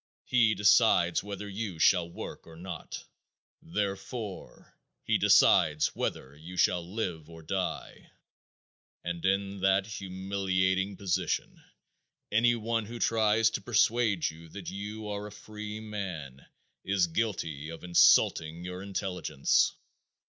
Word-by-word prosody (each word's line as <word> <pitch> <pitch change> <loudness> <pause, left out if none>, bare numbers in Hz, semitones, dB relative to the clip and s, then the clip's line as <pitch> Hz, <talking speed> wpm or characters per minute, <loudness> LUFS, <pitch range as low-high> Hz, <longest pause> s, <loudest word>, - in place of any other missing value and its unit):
He 115 -3 +3
decides 105 -4 +4
whether 100 0 -6
you 100 -3 -5
shall 85 +1 +4
work 85 - -8
or 80 - -12
not. 85 -1 -7 0.6
Therefore, 100 +3 -5 0.3
he - - +1
decides 75 -1 +4
whether 65 +2 -3
you 85 +5 -10
shall 90 0 +3
live 90 -8 -4
or 80 -1 -12
die. 95 +3 -4 0.9
And 85 -1 -4
in 100 +1 0
that 95 0 +3
humiliating 95 -1 -1
position 95 -3 -2 0.7
any 120 +3 +4
one 115 -1 -2
who 120 +2 -7
tries 110 -2 +3
to - - -3
persuade 110 -6 +2
you 80 +1 -9
that 95 +1 -7
you 105 +2 -6
are 105 0 -4
a - - -11
free 105 0 -8
man 90 -11 -6 0.4
is 95 -2 +2
guilty 80 -6 -3
of 80 - -9
insulting 85 -1 +4
your 90 +1 -6
intelligence. 95 -7 0
95 Hz, 120 wpm, -29 LUFS, 85-105 Hz, 0.9 s, decides